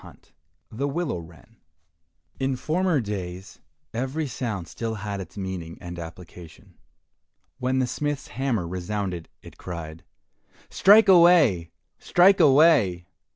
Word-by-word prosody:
171 75 - -18
The 140 - 0
Willow 155 - -2
Wren 85 0 -16 0.8
In 135 0 0
former 165 +2 0
days 95 -3 -7 0.3
every 135 +7 -2
sound 110 -8 -4
still 115 -1 -5
had 100 -1 -5
its 90 +2 -11
meaning 95 -4 -6
and 85 0 -8
application. 85 0 -12 0.9
When 130 +1 0
the 130 - +2
smith's 145 +3 -4
hammer 115 -6 -2
resounded, 90 -1 -4
it - - -14
cried, 85 -2 -8 0.7
"Strike 210 +3 +6
away! 170 - +5 0.3
strike 190 +3 +4
away." 135 - +4
105 Hz, 115 wpm, -24 LUFS, 90-140 Hz, 0.9 s, Strike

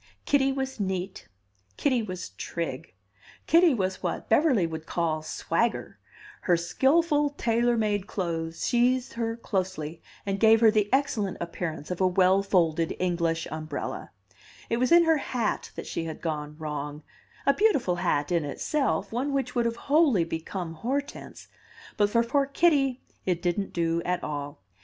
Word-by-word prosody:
Kitty 275 -1 +3
was 265 -2 -3
neat, 190 -1 -3 0.5
Kitty 255 -4 +2
was 185 -4 -6
trig, 135 - -5 0.5
Kitty 335 -3 +5
was 190 -3 -2
what 175 - -3
Beverly 245 - +4
would 160 -1 -6
call 160 -2 -1
"swagger 165 +8 -2 0.2
"; - - -19
her 175 -2 +5
skilful 290 - +2
tailor 235 +1 +2
made 205 -3 0
clothes 165 -4 -3
sheathed 250 +1 +2
her 230 0 -2
closely 180 -7 -3 0.2
and 195 0 -2
gave 225 +1 +6
her 225 -1 +6
the 210 -2 +1
excellent 245 -8 0
appearance 170 -2 -5
of 180 - -3
a 185 - +5
well 185 +1 +4
folded 170 -4 +1
English 170 -2 0
umbrella; 155 -1 -5 0.6
it 230 - +2
was 255 +4 +1
in 340 0 +8
her 325 -1 +4
hat 245 -5 -2
that - - -6
she 165 - -3
had 160 -1 -6
gone 150 -2 -4
wrong 150 -1 -5 0.4
a 280 - +5
beautiful 275 - +2
hat 170 -3 0
in 170 -2 +2
itself, 200 - -1
one 255 +5 -1
which 270 -3 -1
would 240 -1 +1
have 230 0 0
wholly 285 - +4
become 165 +1 -5
Hortense; 275 - -4 0.5
but 205 -1 +2
for 230 +2 +3
poor 275 +4 +1
Kitty 275 -4 +2 0.2
it 180 -2 +1
didn't 180 +3 -1
do 165 -1 0
at 180 0 -1
all. 145 -7 -5
195 Hz, 155 wpm, -27 LUFS, 165-250 Hz, 0.6 s, in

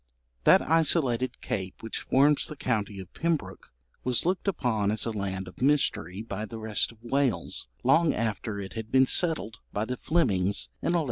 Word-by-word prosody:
] - - -44
That - - +7
isolated 135 -7 +1
cape 95 +1 -4
which 115 - -3
forms 145 +2 +3
the 150 - -7
county 105 -7 -2
of 95 -1 -10
Pembroke 165 -1 -2 0.3
was 125 +2 +1
looked 180 +2 0
upon 115 - +1
as 110 0 +1
a 115 - -1
land 95 -3 -3
of 90 - -12
mystery 125 - +1
by 105 -1 -4
the 115 - -7
rest 110 -1 -1
of 115 0 -21
Wales 120 -8 0 0.2
long 160 +5 +4
after 110 -1 -2
it 95 -1 -6
had 110 -1 -6
been 130 0 +6
settled 140 - 0
by 105 +2 -1
the 125 +2 -4
Flemings 100 - +1
in 170 - 0
1113. - - +3
115 Hz, 185 wpm, -28 LUFS, 100-140 Hz, 0.3 s, That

